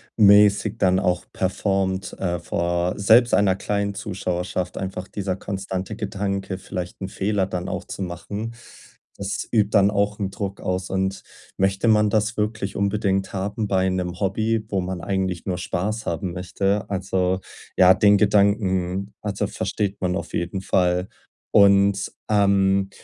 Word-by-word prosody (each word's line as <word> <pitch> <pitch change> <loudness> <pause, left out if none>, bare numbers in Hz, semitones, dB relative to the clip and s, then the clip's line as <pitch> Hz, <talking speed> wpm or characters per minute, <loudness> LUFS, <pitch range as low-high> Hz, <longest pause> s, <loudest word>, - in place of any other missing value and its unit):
mäßig 105 +1 +5
dann 95 -2 +3
auch 90 -2 0
performt, 95 0 -1
äh, 90 -2 -1
vor 85 +1 -1
selbst 115 +4 +5
einer 95 -1 +4
kleinen 100 0 -2
Zuschauerschaft 90 -2 -3
einfach 95 0 -4
dieser 95 -2 -3
konstante 95 +1 -4
Gedanke, 100 -2 -3
vielleicht 90 -1 -6
'n 95 - -4
Fehler 100 -1 0
dann 90 -1 -4
auch - - -3
zu - - -7
machen. 100 +6 -5 0.6
Das 100 0 -3
übt 105 -3 +2
dann 100 -1 +4
auch 100 +1 0
'n 100 - -1
Druck 100 -1 -5
aus 95 0 -2
und 95 0 -2 0.3
möchte 95 +3 +1
man 105 -1 +4
das 110 +2 0
wirklich 105 -2 -2
unbedingt 100 -1 0
haben 100 +3 -2
bei 95 -1 +2
'nem 90 0 -3
Hobby, 110 +3 0
wo 100 - 0
man 90 -1 -4
eigentlich 95 -3 -2
nur 90 -2 -2
Spaß 95 +5 -3
haben 85 +2 -2
möchte? 95 +3 -1
Also 95 -1 0 0.4
ja, 95 0 +7
den 105 -1 +5
Gedanken, 100 -2 +1
also, 100 -2 -2
versteht 100 -1 -3
man 90 0 0
auf - - -5
jeden 90 +2 -2
Fall. 90 0 +1 0.4
Und, 100 0 +4 0.2
ähm, 100 -2 +3
95 Hz, 150 wpm, -23 LUFS, 95-100 Hz, 0.6 s, ja